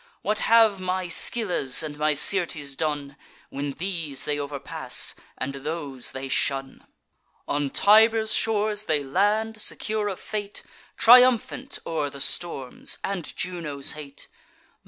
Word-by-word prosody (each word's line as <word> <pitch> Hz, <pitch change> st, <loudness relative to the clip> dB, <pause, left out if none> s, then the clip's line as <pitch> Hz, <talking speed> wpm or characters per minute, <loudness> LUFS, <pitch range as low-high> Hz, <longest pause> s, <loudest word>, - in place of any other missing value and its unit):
What 210 Hz, +1 st, 0 dB
have 225 Hz, -3 st, +4 dB
my 185 Hz, 0 st, -2 dB
Scyllas 175 Hz, -, +3 dB
and 150 Hz, -1 st, -6 dB
my 150 Hz, 0 st, 0 dB
Syrtes 150 Hz, -4 st, +1 dB
done, 145 Hz, -2 st, -3 dB, 0.4 s
When 140 Hz, 0 st, -4 dB
these 165 Hz, -5 st, -3 dB
they 145 Hz, 0 st, -1 dB
overpass, 140 Hz, -1 st, -1 dB, 0.2 s
and 140 Hz, +1 st, -4 dB
those 140 Hz, -2 st, -3 dB
they 135 Hz, 0 st, -6 dB
shun? 135 Hz, 0 st, -1 dB, 0.6 s
On 145 Hz, -1 st, -1 dB
Tiber's 220 Hz, +4 st, +4 dB
shores 215 Hz, -1 st, 0 dB
they 150 Hz, -5 st, 0 dB
land, 210 Hz, +9 st, 0 dB
secure 215 Hz, 0 st, -1 dB
of 195 Hz, -3 st, -4 dB
fate, 205 Hz, -1 st, -5 dB, 0.3 s
Triumphant 250 Hz, +2 st, +4 dB
o'er 155 Hz, -3 st, -2 dB
the 140 Hz, 0 st, -11 dB
storms 140 Hz, -2 st, -2 dB
and 195 Hz, -5 st, -4 dB
Juno's 165 Hz, -6 st, -2 dB
hate. 145 Hz, -2 st, -9 dB
165 Hz, 125 wpm, -24 LUFS, 140-210 Hz, 0.6 s, have